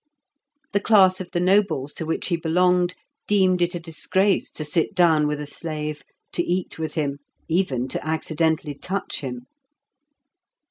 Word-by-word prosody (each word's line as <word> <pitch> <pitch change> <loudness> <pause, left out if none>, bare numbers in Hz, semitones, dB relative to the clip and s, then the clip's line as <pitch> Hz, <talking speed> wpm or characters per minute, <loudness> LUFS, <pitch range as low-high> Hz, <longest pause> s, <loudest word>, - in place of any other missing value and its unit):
The 200 - +2
class 190 -3 +5
of 180 - -7
the 175 - -1
nobles 185 -7 +2
to 160 - -5
which 165 - -2
he 175 - +2
belonged 180 +2 +2 0.3
deemed 185 -3 +3
it 175 +1 +1
a - - -2
disgrace 185 +4 0
to 155 - -6
sit 165 +6 0
down 160 -4 +4
with 150 0 -2
a 150 - -4
slave, 150 0 -4 0.3
to - - +1
eat 175 -1 -2
with 155 -1 -4
him, 140 -3 -1 0.3
even 160 -8 0
to - - -3
accidently 160 0 0
touch 190 +7 -4
him. 125 -3 -6
165 Hz, 155 wpm, -23 LUFS, 150-185 Hz, 0.3 s, class